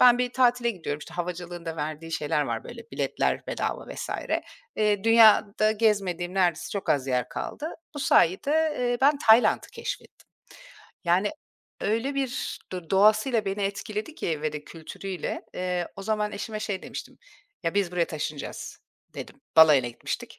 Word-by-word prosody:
ben 245 Hz, -1 st, +7 dB
bir 250 Hz, 0 st, 0 dB
tatile 245 Hz, -2 st, +3 dB
gidiyorum. 165 Hz, -7 st, -4 dB
İşte, 160 Hz, +3 st, -11 dB
havacılığın 175 Hz, 0 st, -5 dB
da 165 Hz, 0 st, -4 dB
verdiği 155 Hz, +2 st, -5 dB
şeyler 150 Hz, -1 st, 0 dB
var. 115 Hz, -4 st, -3 dB
Böyle, 235 Hz, -1 st, -9 dB
biletler -, -, -1 dB
bedava -, -, -3 dB
vs. -, -, -5 dB, 0.7 s
eee, 210 Hz, -1 st, +1 dB
dünyada 215 Hz, -2 st, +6 dB
gezmediğim 195 Hz, -5 st, 0 dB
neredeyse 180 Hz, -4 st, +1 dB
çok 200 Hz, -, -2 dB
az 135 Hz, -2 st, +2 dB
yer 125 Hz, -1 st, 0 dB
kaldı. 310 Hz, +3 st, -5 dB, 0.2 s
Bu -, -, -5 dB
sayede, 295 Hz, -, +3 dB
eee, 245 Hz, -1 st, 0 dB
ben 285 Hz, +2 st, +4 dB
Tayland'ı 225 Hz, +2 st, +6 dB
keşfettim. -, -, -7 dB, 0.8 s
Yani, 180 Hz, +4 st, +3 dB, 0.5 s
öyle 230 Hz, +7 st, 0 dB
bir 270 Hz, -3 st, -2 dB
do 180 Hz, -3 st, -6 dB
doğasıyla 215 Hz, +3 st, +4 dB
beni 195 Hz, +1 st, -2 dB
etkiledi 210 Hz, +7 st, -3 dB
ki 155 Hz, -, -3 dB
ve 155 Hz, -1 st, -1 dB
de 150 Hz, 0 st, -6 dB
kültürüyle, 175 Hz, +3 st, -6 dB
eee, 180 Hz, -1 st, -2 dB
o 195 Hz, -, -7 dB
zaman 210 Hz, 0 st, -1 dB
eşime 215 Hz, +1 st, -5 dB
şey 200 Hz, -3 st, -3 dB
demiştim, -, -, -8 dB, 0.4 s
“Ya, 165 Hz, +1 st, -1 dB
biz 195 Hz, -3 st, +1 dB
buraya 175 Hz, -1 st, +2 dB
taşınacağız,” 150 Hz, -2 st, -5 dB, 0.4 s
dedim. -, -, -9 dB, 0.2 s
Balayına 150 Hz, -6 st, +7 dB
gitmiştik, 120 Hz, -, -6 dB
195 Hz, 155 wpm, -26 LUFS, 165-225 Hz, 0.8 s, ben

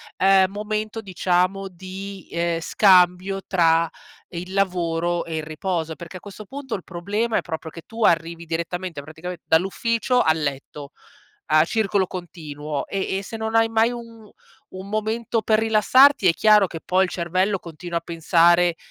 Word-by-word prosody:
ehm, 190 Hz, 0 st, +4 dB
momento 215 Hz, +2 st, -4 dB
diciamo 185 Hz, 0 st, 0 dB
di, 190 Hz, +1 st, -9 dB
ehm, 170 Hz, 0 st, -1 dB
scambio 185 Hz, +1 st, +3 dB
tra 165 Hz, -2 st, +3 dB, 0.4 s
il 180 Hz, +1 st, -7 dB
lavoro 175 Hz, -3 st, 0 dB
e 165 Hz, -, -5 dB
il 155 Hz, -, -3 dB
riposo. 160 Hz, +1 st, -3 dB
Perché 170 Hz, +4 st, -9 dB
a -, -, -11 dB
questo 205 Hz, +1 st, -10 dB
punto 270 Hz, +2 st, -7 dB
il 185 Hz, -, -7 dB
problema 205 Hz, +6 st, -2 dB
è -, -, +1 dB
proprio 160 Hz, -1 st, -6 dB
che 165 Hz, -, -10 dB
tu 225 Hz, 0 st, -5 dB
arrivi 170 Hz, -1 st, +1 dB
direttamente, 170 Hz, 0 st, -4 dB
praticamente, 160 Hz, +4 st, -8 dB
dall'ufficio 230 Hz, +8 st, +1 dB
al 160 Hz, -4 st, +2 dB
letto 140 Hz, 0 st, -5 dB, 0.6 s
a 155 Hz, 0 st, +6 dB
circolo 200 Hz, 0 st, 0 dB
continuo. 150 Hz, -5 st, -6 dB
E 190 Hz, -1 st, -2 dB
e -, -, -5 dB
se 225 Hz, -, -7 dB
non 220 Hz, 0 st, -4 dB
hai 225 Hz, 0 st, +4 dB
mai 225 Hz, +1 st, +2 dB
un 230 Hz, -3 st, -10 dB, 0.4 s
un 190 Hz, +1 st, -8 dB
momento 220 Hz, +2 st, -1 dB
per 215 Hz, -1 st, +2 dB
rilassarti 225 Hz, +2 st, +5 dB
è -, -, +5 dB
chiaro 210 Hz, +1 st, +4 dB
che 165 Hz, -, -7 dB
poi 185 Hz, +3 st, +1 dB
il 185 Hz, -, 0 dB
cervello 185 Hz, +3 st, 0 dB
continua 170 Hz, 0 st, -5 dB
a -, -, -11 dB
pensare 170 Hz, +1 st, +3 dB
185 Hz, 160 wpm, -22 LUFS, 170-210 Hz, 0.6 s, a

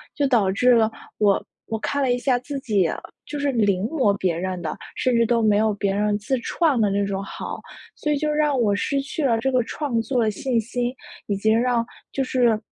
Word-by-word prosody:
就 285 Hz, -2 st, +1 dB
导 220 Hz, -8 st, +3 dB
致 250 Hz, +6 st, +3 dB
了 225 Hz, -2 st, +4 dB, 0.3 s
我 205 Hz, -2 st, +3 dB, 0.2 s
我 220 Hz, -, -3 dB
看 280 Hz, +5 st, -1 dB
了 260 Hz, -, +2 dB
一 -, -, 0 dB
下 250 Hz, 0 st, +2 dB
自 275 Hz, +3 st, -5 dB
己 205 Hz, -9 st, +1 dB, 0.4 s
就 295 Hz, -, -5 dB
是 285 Hz, 0 st, +1 dB
临 205 Hz, -6 st, +2 dB
摹 245 Hz, -6 st, +1 dB
别 180 Hz, -4 st, 0 dB
人 185 Hz, 0 st, -3 dB
的， 160 Hz, -, -4 dB, 0.2 s
甚 255 Hz, -2 st, +1 dB
至 230 Hz, -, +4 dB
都 235 Hz, 0 st, +2 dB
没 210 Hz, -2 st, +3 dB
有 215 Hz, 0 st, +2 dB
别 200 Hz, -1 st, -1 dB
人 210 Hz, +1 st, +1 dB
自 260 Hz, +6 st, -1 dB
创 300 Hz, -1 st, +1 dB
的 210 Hz, -2 st, +3 dB
那 200 Hz, +1 st, +1 dB
种 195 Hz, 0 st, -3 dB
好。 -, -, -6 dB, 0.4 s
所 300 Hz, -, -2 dB
以 295 Hz, -, +2 dB
就 305 Hz, -, 0 dB
让 300 Hz, -3 st, +1 dB
我 205 Hz, -3 st, +2 dB
失 275 Hz, +7 st, 0 dB
去 280 Hz, +3 st, -4 dB
了 230 Hz, -4 st, +2 dB
这 265 Hz, +4 st, 0 dB
个 255 Hz, -2 st, +2 dB
创 250 Hz, -1 st, -2 dB
作 245 Hz, +2 st, 0 dB
的 220 Hz, -, +2 dB
信 235 Hz, +3 st, 0 dB
心， 245 Hz, +2 st, -2 dB, 0.3 s
以 200 Hz, -, 0 dB
及 215 Hz, +2 st, +1 dB
让 235 Hz, +1 st, +2 dB, 0.3 s
就 270 Hz, -, -1 dB
是， 245 Hz, -4 st, +2 dB
230 Hz, 245 characters per minute, -23 LUFS, 205-265 Hz, 0.4 s, 了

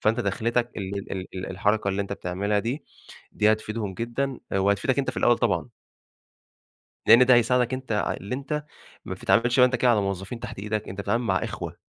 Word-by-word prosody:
فأنت 115 Hz, +3 st, +2 dB
دَخلتك 120 Hz, +1 st, 0 dB
ال 100 Hz, 0 st, -5 dB
ال 95 Hz, 0 st, -5 dB
الحركة 100 Hz, +2 st, +1 dB
اللي 100 Hz, +1 st, 0 dB
أنت 100 Hz, -, -6 dB
بتعملها 100 Hz, +3 st, -1 dB
دي، 125 Hz, +8 st, -3 dB, 0.5 s
دي 105 Hz, +1 st, +4 dB
هتفيدهم 110 Hz, -2 st, -3 dB
جدًا 120 Hz, +4 st, -3 dB
وهتفيدك 100 Hz, +7 st, +1 dB
أنت 135 Hz, -2 st, +1 dB
في 120 Hz, -, -12 dB
الأول 120 Hz, -1 st, +3 dB
طبعًا. -, -, 0 dB, 1.4 s
لأن 120 Hz, +3 st, +8 dB
ده 130 Hz, -, +7 dB
هيساعدك 125 Hz, +1 st, +3 dB
أنت 130 Hz, -3 st, -5 dB, 0.3 s
اللي 100 Hz, +7 st, -4 dB
أنت 150 Hz, +2 st, -3 dB, 0.4 s
ما 95 Hz, -, -4 dB
بتتعاملش 115 Hz, +7 st, +2 dB
أنت 125 Hz, 0 st, +5 dB
كده 125 Hz, 0 st, +3 dB
على 110 Hz, -, +3 dB
موظفين 100 Hz, +4 st, -4 dB
تحت -, -, -7 dB
إيدك، 105 Hz, +1 st, -3 dB
أنت 95 Hz, +2 st, -5 dB
بتتعامل 115 Hz, +4 st, 0 dB
مع 95 Hz, -4 st, +1 dB
إخوة، -, -, -6 dB
110 Hz, 175 wpm, -25 LUFS, 100-125 Hz, 1.4 s, لأن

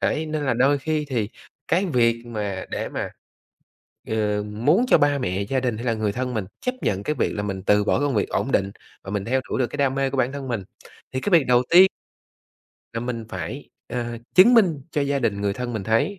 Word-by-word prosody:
Đấy, 160 Hz, +1 st, 0 dB
nên 155 Hz, -1 st, -2 dB
là 130 Hz, -, +1 dB
đôi 135 Hz, +4 st, +3 dB
khi 155 Hz, +1 st, -1 dB
thì 115 Hz, -6 st, -1 dB, 0.4 s
cái 185 Hz, +4 st, +2 dB
việc 115 Hz, -5 st, +2 dB
mà 105 Hz, -5 st, -4 dB
để -, -, -3 dB
mà, -, -, -4 dB, 1.0 s
ừ, 105 Hz, -2 st, 0 dB
muốn 125 Hz, -, +2 dB
cho -, -, +6 dB
ba 145 Hz, -1 st, +3 dB
mẹ, 95 Hz, -5 st, -1 dB
gia 130 Hz, +6 st, 0 dB
đình 120 Hz, -4 st, -1 dB
hay 120 Hz, -, -6 dB
là 115 Hz, -, +2 dB
người 110 Hz, -2 st, -1 dB
thân 125 Hz, +2 st, -3 dB
mình 105 Hz, -4 st, -2 dB, 0.2 s
chấp 250 Hz, -, -1 dB
nhận 100 Hz, 0 st, -1 dB
cái 150 Hz, -, -1 dB
việc -, -, 0 dB
là 105 Hz, -, -2 dB
mình 95 Hz, -2 st, -4 dB
từ 105 Hz, +1 st, +3 dB
bỏ 105 Hz, -, +1 dB
công 145 Hz, -4 st, 0 dB
việc 105 Hz, -, +1 dB
ổn 135 Hz, -, -1 dB
định, 100 Hz, -4 st, +1 dB, 0.3 s
mà 95 Hz, -, -8 dB
mình 100 Hz, -2 st, -2 dB
theo 130 Hz, +2 st, +1 dB
đuổi -, -, -1 dB
được 125 Hz, -, +2 dB
cái 145 Hz, -, -7 dB
đam 135 Hz, -1 st, +1 dB
mê 135 Hz, 0 st, +1 dB
của 135 Hz, -, -4 dB
bản 130 Hz, +1 st, +1 dB
thân 140 Hz, -2 st, -6 dB
mình, 115 Hz, -5 st, -2 dB, 0.5 s
thì 130 Hz, -, -2 dB
cái -, -, -1 dB
việc 165 Hz, -5 st, +6 dB
đầu 125 Hz, 0 st, +4 dB
ti 185 Hz, +3 st, +8 dB, 1.1 s
là 115 Hz, -, -3 dB
mình 115 Hz, -2 st, -4 dB
phải, -, -, -6 dB, 0.2 s
à, 120 Hz, -1 st, -4 dB, 0.2 s
chứng 220 Hz, +7 st, +8 dB
minh 170 Hz, -, +4 dB
cho 150 Hz, -, -1 dB
gia 140 Hz, 0 st, +1 dB
đình 105 Hz, -5 st, -1 dB
người 100 Hz, -1 st, 0 dB
thân 125 Hz, +2 st, -4 dB
mình 110 Hz, -3 st, -3 dB
thấy 115 Hz, -, +1 dB
125 Hz, 240 wpm, -23 LUFS, 105-145 Hz, 1.1 s, ti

